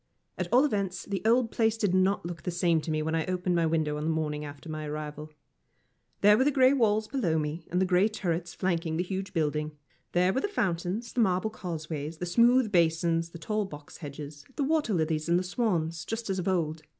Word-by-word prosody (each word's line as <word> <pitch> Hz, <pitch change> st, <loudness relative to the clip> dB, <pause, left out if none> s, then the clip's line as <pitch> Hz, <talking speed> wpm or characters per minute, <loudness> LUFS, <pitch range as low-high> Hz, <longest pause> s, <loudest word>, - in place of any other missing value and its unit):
At -, -, -4 dB
all 255 Hz, +4 st, +6 dB
events, 195 Hz, -8 st, -2 dB
the 200 Hz, -1 st, -3 dB
old 230 Hz, 0 st, +3 dB
place 225 Hz, -1 st, +1 dB
did 205 Hz, -5 st, +1 dB
not 185 Hz, 0 st, +2 dB
look 170 Hz, -2 st, -6 dB
the 180 Hz, -, -3 dB
same 170 Hz, -2 st, +2 dB
to 150 Hz, -, -6 dB
me 155 Hz, 0 st, 0 dB
when 160 Hz, +1 st, -2 dB
I 165 Hz, -1 st, +1 dB
opened 180 Hz, 0 st, 0 dB
my 170 Hz, -1 st, +2 dB
window 155 Hz, -2 st, 0 dB
on 150 Hz, -, -4 dB
the 160 Hz, -, 0 dB
morning 150 Hz, -2 st, -1 dB
after 145 Hz, +2 st, -9 dB
my 155 Hz, -1 st, -4 dB
arrival. 150 Hz, 0 st, -6 dB, 0.9 s
There 210 Hz, +2 st, +6 dB
were -, -, +5 dB
the 285 Hz, -, +4 dB
grey 260 Hz, -1 st, +5 dB
walls 215 Hz, -4 st, +2 dB
below 205 Hz, -, 0 dB
me, 155 Hz, +2 st, -3 dB
and 180 Hz, -, 0 dB
the 190 Hz, -, +3 dB
grey 185 Hz, +2 st, +4 dB
turrets 175 Hz, -5 st, -2 dB
flanking 165 Hz, -3 st, -1 dB
the 175 Hz, -, +1 dB
huge 190 Hz, +1 st, -4 dB
building; 150 Hz, -1 st, -1 dB, 0.4 s
there 180 Hz, +2 st, +3 dB
were 265 Hz, -, 0 dB
the -, -, 0 dB
fountains, 195 Hz, -, -2 dB
the -, -, -2 dB
marble 190 Hz, +1 st, +1 dB
causeways, 160 Hz, -5 st, -5 dB
the 180 Hz, -, -3 dB
smooth 235 Hz, +5 st, +4 dB
basins, 165 Hz, -1 st, +2 dB
the 170 Hz, -, -10 dB
tall 215 Hz, +3 st, -1 dB
box 150 Hz, -5 st, -11 dB
hedges, 145 Hz, -1 st, -8 dB
the 285 Hz, -, 0 dB
water 295 Hz, -7 st, +1 dB
lilies 160 Hz, -1 st, 0 dB
and 170 Hz, -, +4 dB
the 180 Hz, -, 0 dB
swans, 175 Hz, -5 st, -1 dB
just 225 Hz, +2 st, -3 dB
as 190 Hz, -, -1 dB
of 180 Hz, -, -3 dB
old. 165 Hz, -4 st, 0 dB
175 Hz, 220 wpm, -28 LUFS, 160-210 Hz, 0.9 s, all